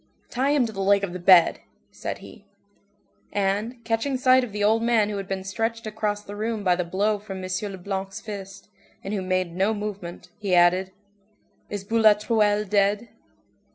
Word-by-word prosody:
"Tie 265 +3 0
him 285 -4 +3
to 220 - -6
the 195 - -4
leg 200 +1 +3
of 185 -3 -3
the 180 - -5
bed," 175 -1 +6 0.3
said - - -5
he. - - -14 0.9
And, 205 +5 -1
catching 230 +4 -1
sight 255 0 +5
of 245 - -5
the 205 0 -2
old 220 +2 +3
man 230 -3 +2
who 205 - -3
had 195 -1 -5
been 195 -1 -3
stretched 225 +4 -3
across 210 -1 -2
the 205 - -9
room 220 0 -3
by 180 -2 +3
the 180 - -1
blow 205 +4 0
from 195 -2 -7
M. - - -4 0.2
Leblanc's 195 0 -5
fist, 200 -2 -8 0.4
and 195 - -4
who 200 - -1
made 185 -2 -1
no 195 +4 +1
movement, 205 -4 -6
he 200 -4 +1
added:— 180 +2 +4 0.8
"Is 205 -2 -4
Boulatruelle 210 -1 +3
dead?" 205 +3 +1
205 Hz, 180 wpm, -24 LUFS, 190-220 Hz, 0.9 s, bed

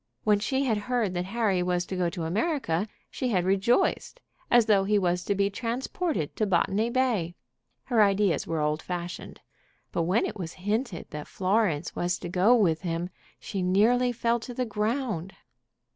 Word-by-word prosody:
When 210 -1 +3
she 265 +6 0
had 220 -5 +1
heard 235 -7 +1
that 175 0 -2
Harry 200 -3 0
was 180 0 0
to 190 - -5
go 180 -2 +1
to 170 -1 -5
America 205 - 0 0.2
she 255 - -2
had 185 -6 +1
rejoiced, 210 - +1 0.3
as 240 -2 +5
though 205 -3 +4
he 205 +2 +2
was 180 -2 +1
to 200 - 0
be 200 +1 +1
transported 245 - -2
to 215 - +1
Botany 195 +4 +1
Bay. 235 -10 0 0.5
Her 235 -4 +2
ideas 200 -5 +2
were 165 -2 -1
old 150 +1 0
fashioned. 175 -1 -6 0.5
But - - -1
when 205 +6 +3
it - - -5
was 165 -2 -5
hinted 205 0 -2
that 150 0 -6
Florence 185 -5 0
was 175 0 0
to 175 - -7
go 190 +7 +4
with 175 -9 +2
him 175 0 -3 0.3
she 195 - -4
nearly 225 +7 +3
fell 235 0 0
to 245 +1 -8
the 255 - -1
ground. 215 - -2
200 Hz, 175 wpm, -27 LUFS, 180-230 Hz, 0.5 s, as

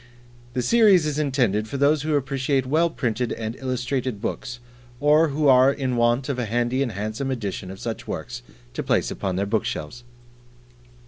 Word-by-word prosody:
The 125 -1 -1
series 205 - +5
is 150 -1 -1
intended 120 -8 +1
for 140 - -4
those 145 +2 +3
who 155 +1 0
appreciate 135 -1 0
well 160 +6 +2
printed 125 -5 -2
and 110 0 -5
illustrated 130 -2 -2
books, 120 +4 -5 0.4
or 150 +3 +4
who 150 0 0
are 130 0 +6
in 130 -3 -2
want 120 +2 +2
of 135 -3 -2
a 125 - -1
handy 120 +4 0
and 125 -5 -1
handsome 110 +7 -3
edition 100 -7 -4
of 95 0 -9
such - - -5
works - - -5 0.3
to - - -3
place - - 0
upon 95 -2 -3
their 100 +2 0
bookshelves. 100 +2 -3
130 Hz, 175 wpm, -23 LUFS, 115-140 Hz, 0.4 s, are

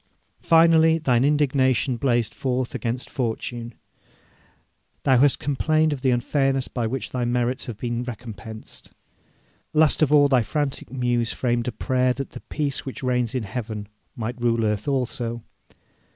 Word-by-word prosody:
Finally, 165 -1 +5
thine 125 -6 +2
indignation 135 -3 +2
blazed 120 -3 0
forth 130 -1 -2
against 120 +2 -3
fortune; 120 -2 -4 1.3
thou 130 -3 +4
hast 140 0 +4
complained 155 +3 +1
of 135 - -6
the 130 - +2
unfairness 135 +2 +1
with 120 -3 0
which 135 +2 -4
thy 125 -1 -1
merits 120 +2 -1
have 115 -4 -6
been 120 +1 -2
recompensed. 110 -2 -9 0.8
Last 155 0 +3
of 150 -2 +3
all 145 -1 +6
thy 130 -3 +4
frantic 135 +4 -3
muse 120 -3 0
framed 120 -1 -1
a - - 0
prayer 125 +2 +1
that 135 +1 -6
the - - -8
peace 145 -3 -2
which 135 0 -7
reigns 125 -1 0
in 125 - -1
heaven 110 -1 -5 0.3
might 120 +1 -5
rule 115 -1 +2
earth 105 +2 -1
also. 120 -4 -2
125 Hz, 150 wpm, -24 LUFS, 120-135 Hz, 1.3 s, all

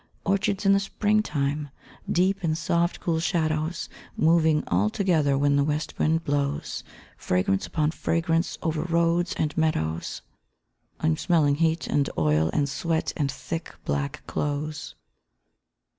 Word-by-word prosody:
_ - - -34 0.2
Orchards 195 +1 0
in 195 - +6
the 195 - +4
Spring 210 +2 +1
time! 145 -4 -2 0.4
Deep 190 +2 +2
in 155 -2 +1
soft, 170 +1 0
cool 165 -2 0
shadows, 160 -1 -1 0.3
Moving 160 -1 +4
all 95 +4 +2
together 155 - +2
when 140 0 +3
the 140 - +3
west 150 +1 -2
wind 160 +1 +2
blows 145 0 -2 0.3
Fragrance 90 +1 0
upon 155 -1 0
fragrance 165 +1 0
over 160 -3 0
road 170 +1 +1
and 150 -1 -1
meadows 85 - -1 0.8
_I'm 80 0 +1
smelling 155 -5 +3
heat 160 0 +1
and 140 -1 +1
oil 80 +1 +2
and 145 -1 +1
sweat, 160 +3 -1
and 140 -3 0
thick, 150 +6 -6
black 70 0 -2
clothes. 145 +1 -3
155 Hz, 140 wpm, -26 LUFS, 140-170 Hz, 0.8 s, in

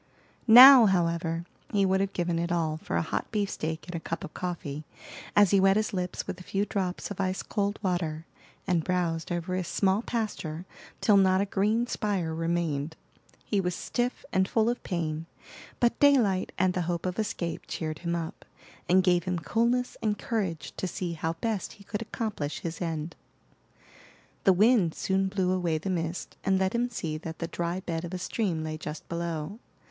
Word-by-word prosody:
Now, 250 +1 +11
however, 170 -2 0 0.3
he 200 -2 +3
would 190 0 +2
have 195 0 -1
given 175 -1 -1
it 170 +1 -1
all 160 -3 0
for - - -5
a - - +1
hot 160 - -3
beefsteak 185 -7 -2
and 180 - -7
a 170 - -2
cup 165 +1 -5
of - - -8
coffee, 160 -5 -4 0.5
as 205 -3 +6
he 200 - +5
wet 195 +1 +5
his 215 -1 -1
lips 180 -2 -3
with - - -5
a - - -9
few 195 +2 -1
drops 190 -1 -3
of 200 - -3
ice 185 0 -1
cold 205 0 -1
water, 165 -4 -1 0.4
and 175 -4 +1
browsed 175 -2 -1
over 175 +1 -2
his 185 -2 -2
small 195 +1 +2
pasture 185 -9 -3 0.4
till 205 -2 +5
not 190 -1 +4
a 200 - +2
green 210 +4 +1
spire 200 -9 -1
remained. 165 -2 -1 0.5
He 205 -2 +1
was 180 -1 -1
stiff, 245 +1 -2
and 190 0 +3
full 225 +2 +2
of 245 - -5
pain, 165 -3 -3 0.5
but 240 -1 +2
daylight 240 -10 +4
and 185 0 +2
the 180 - -1
hope 170 0 -2
of 185 +3 -2
escape 175 -5 -3
cheered 155 -2 -4
him 170 -1 -2
up, 165 -1 -5 0.5
and 185 +1 +5
gave 180 -2 +3
him 180 -1 -1
coolness 235 - 0
and 210 -1 0
courage 170 - -3
to 185 - -2
see 175 0 -3
how 160 0 -2
best 210 +3 -3
he 200 - -16
could 205 +2 -4
accomplish 210 -10 -4
his 165 +1 -5
end. 165 -1 -3 1.3
The 195 - +7
wind 205 -3 +4
soon 195 0 0
blew 190 -2 0
away 175 -4 0
the 185 +5 -3
mist 165 -1 -3
and 190 0 +2
let 190 0 +1
him 240 +1 +1
see 160 -9 -4
that 160 -1 -7
the 165 - -3
dry 175 +2 -3
bed 165 -2 -3
of 175 +1 -5
a - - -2
stream 180 -3 -2
lay 155 0 -4
just 150 0 -7
below. 170 +3 -4
180 Hz, 190 wpm, -28 LUFS, 165-200 Hz, 1.3 s, Now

